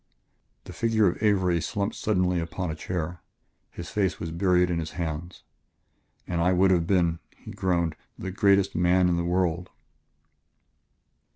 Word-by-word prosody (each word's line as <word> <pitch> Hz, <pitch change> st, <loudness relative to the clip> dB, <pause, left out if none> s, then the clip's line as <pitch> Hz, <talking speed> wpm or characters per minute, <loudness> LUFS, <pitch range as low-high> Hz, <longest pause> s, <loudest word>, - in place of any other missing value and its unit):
The -, -, -10 dB
figure 110 Hz, -2 st, +2 dB
of 90 Hz, -, -2 dB
Avery 95 Hz, -5 st, +2 dB
slumped 100 Hz, +6 st, -2 dB
suddenly 90 Hz, -4 st, +1 dB
upon 85 Hz, +1 st, -3 dB
a -, -, -5 dB
chair; 85 Hz, 0 st, -4 dB, 0.5 s
his 85 Hz, -, -9 dB
face 100 Hz, -3 st, 0 dB
was 80 Hz, -, -4 dB
buried 90 Hz, +1 st, +2 dB
in 85 Hz, -, 0 dB
his 80 Hz, -1 st, -5 dB
hands. 85 Hz, +1 st, -5 dB, 0.8 s
"And 85 Hz, -2 st, -2 dB
I 90 Hz, +2 st, +3 dB
would 95 Hz, +1 st, +4 dB
have 85 Hz, -2 st, +2 dB
been," 85 Hz, -3 st, +2 dB, 0.2 s
he -, -, -11 dB
groaned, 85 Hz, -4 st, 0 dB, 0.2 s
"the 95 Hz, -, -5 dB
greatest 100 Hz, 0 st, +3 dB
man 90 Hz, +1 st, +3 dB
in 85 Hz, -, +2 dB
the 85 Hz, -, -1 dB
world." 90 Hz, 0 st, 0 dB
90 Hz, 155 wpm, -26 LUFS, 85-95 Hz, 0.8 s, would